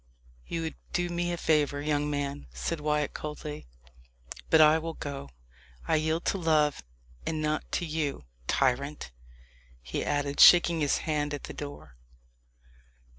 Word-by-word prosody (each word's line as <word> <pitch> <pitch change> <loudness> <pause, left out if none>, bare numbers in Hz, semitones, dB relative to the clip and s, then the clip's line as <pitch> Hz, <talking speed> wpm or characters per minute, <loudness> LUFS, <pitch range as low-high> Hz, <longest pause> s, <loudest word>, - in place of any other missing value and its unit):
"You 165 -1 -3
would 160 - -5 0.2
do 175 0 0
me 175 0 -1
a 175 - -2
favour, 150 -3 +1
young 150 0 0
man," 140 - -3
said 155 - -2
Wyat 150 -1 0
coldly; 150 - -6 0.8
"but 160 - +6
I 155 +1 +7
will 165 0 -5
go. 140 - -6 0.6
I - - +3
yield 160 +2 -1
to 195 - 0
love, 155 -3 +2 0.4
and 155 - -2
not 155 0 -2
to 175 - 0
you, 150 - -3 0.2
tyrant!" 135 - 0 0.7
he - - -4
added, 145 0 -1
shaking 170 -1 +8
his 145 -2 +2
hand 150 -2 -1
at 145 - -9
the - - -7
door. 70 -3 -9
150 Hz, 145 wpm, -29 LUFS, 145-160 Hz, 0.8 s, shaking